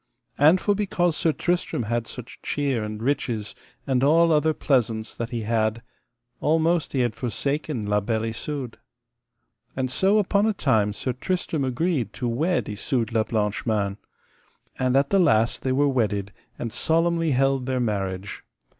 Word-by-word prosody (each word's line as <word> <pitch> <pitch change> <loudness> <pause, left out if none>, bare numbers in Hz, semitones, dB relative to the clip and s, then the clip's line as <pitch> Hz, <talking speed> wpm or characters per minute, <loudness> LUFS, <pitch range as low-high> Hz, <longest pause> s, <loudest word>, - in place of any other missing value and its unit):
And 155 +6 +6
for 205 - +1
because 185 -5 0
Sir 160 - +2
Tristram 175 -6 -1
had 115 +1 -2
such 125 -1 -10
cheer 140 -6 -1
and 105 +1 -5
riches, 115 -6 -1 0.3
and 130 -1 +1
all 165 +4 +5
other 155 0 +3
pleasaunce 115 -7 0
that 115 0 -4
he 120 -2 -3
had, 110 +1 0 0.6
almost 160 +1 +1
he 135 - +1
had 120 -3 0
forsaken 135 +1 -2
La 105 0 +2
Beale 110 +2 -1
Isoud. 135 -2 -5 1.0
And 130 -1 -2
so 195 +9 +3
upon 205 +1 +2
a 220 - +2
time 110 - +2
Sir 125 +4 -3
Tristram 160 +2 -2
agreed 130 - -1
to 125 - -3
wed 160 +10 0
Isoud 115 +3 -2
la 110 -1 +2
Blanche 105 -1 -1
Mains. 100 -3 0 0.8
And 130 0 +2
at 140 0 +2
the 195 - +4
last 115 -9 +3
they 130 - -1
were 145 +2 +3
wedded, 105 -6 0 0.2
and 115 -2 -5
solemnly 165 0 +2
held 135 0 +1
their 130 -1 0
marriage. 100 -4 -3
130 Hz, 160 wpm, -24 LUFS, 110-155 Hz, 1.0 s, And